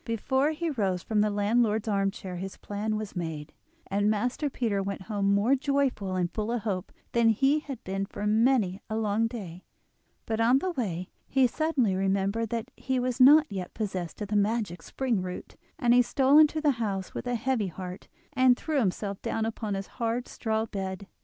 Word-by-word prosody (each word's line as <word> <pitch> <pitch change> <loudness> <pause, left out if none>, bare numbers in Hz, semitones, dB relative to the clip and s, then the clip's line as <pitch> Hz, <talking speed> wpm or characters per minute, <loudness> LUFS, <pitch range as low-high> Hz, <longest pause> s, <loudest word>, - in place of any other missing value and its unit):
Before 265 +5 +1
he 320 +1 -2
rose 195 -8 -1
from 215 -2 +1
the 210 - +2
landlord's 215 +2 +1
arm 195 -2 +2
chair 185 -2 -7
his 190 +2 -6
plan 210 +1 -3
was 215 -2 -5
made, 160 -4 -5 0.3
and 205 +2 +1
Master 245 +7 0
Peter 225 -7 -1
went 195 0 -4
home 200 -1 0
more 205 +6 +3
joyful 275 -9 0
and 180 -1 0
full 215 +1 -2
of 240 -3 -2
hope 195 -4 -3 0.2
than 235 -1 +4
he 270 +7 +3
had 280 -3 -8
been 195 +1 -3
for 205 - -5
many 215 -3 +2
a 220 - -2
long 220 +1 +1
day; 190 -7 -8 0.6
but 220 0 -2
on 240 +3 +5
the 370 +7 -1
way 185 - -3 0.2
he 265 -1 +3
suddenly 265 -5 +1
remembered 195 +3 0
that 235 +2 -3
he 260 -1 -1
was 250 0 -2
not 295 +4 +8
yet 185 -3 -5
possessed 190 -6 -4
of 205 - -7
the 210 - -1
magic 205 -4 0
spring 245 -3 -1
root, 180 0 -7 0.2
and 240 -1 +3
he 245 - +7
stole 270 +4 +4
into 310 0 +5
the 300 -2 +4
house 195 -3 -2
with - - -5
a 245 - 0
heavy 235 -3 0
heart, 180 +1 -8 0.3
and 255 -2 +5
threw 310 -3 -1
himself 200 -2 -1
down 220 - -1
upon 220 -2 -3
his 195 0 -4
hard 235 +2 -3
straw 220 -1 -1
bed. 195 -2 -5
215 Hz, 195 wpm, -28 LUFS, 195-250 Hz, 0.6 s, not